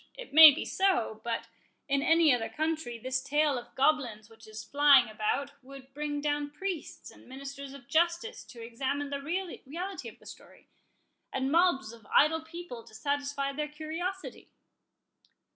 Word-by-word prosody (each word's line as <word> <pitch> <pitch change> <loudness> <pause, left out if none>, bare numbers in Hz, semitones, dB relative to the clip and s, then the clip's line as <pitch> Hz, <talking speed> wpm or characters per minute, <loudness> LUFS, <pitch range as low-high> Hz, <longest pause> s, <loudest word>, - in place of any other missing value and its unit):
It - - -10
may 315 0 +12
be 285 - -4
so; 360 - 0
but, 230 -1 -3 0.4
in 280 0 +1
any 325 -1 +5
other 230 -2 -1
country, 315 -6 -3
this 260 +3 -2
tale 295 +1 +1
of 240 -1 -8
goblins 250 -7 0
which 225 0 -16
is 215 0 -8
flying 280 -3 +5
about 215 +6 -2
would 270 0 -13
bring 295 0 -3
down 290 0 -1
priests 360 +2 -6
and - - -18
ministers 275 +1 -8
of 255 -3 -14
justice 340 +8 0
to 235 -1 -11
examine 275 +5 -3
the 280 0 -3
reality 350 +2 -5
of - - -17
the - - -22
story, - - -14 0.6
and 265 +1 -1
mobs 325 -9 +2
of 225 -3 -16
idle 320 +2 +3
people 325 -7 -9
to 220 -2 -16
satisfy 280 +2 -2
their 300 +2 -3
curiosity." 325 +5 -6
280 Hz, 160 wpm, -29 LUFS, 255-315 Hz, 0.6 s, may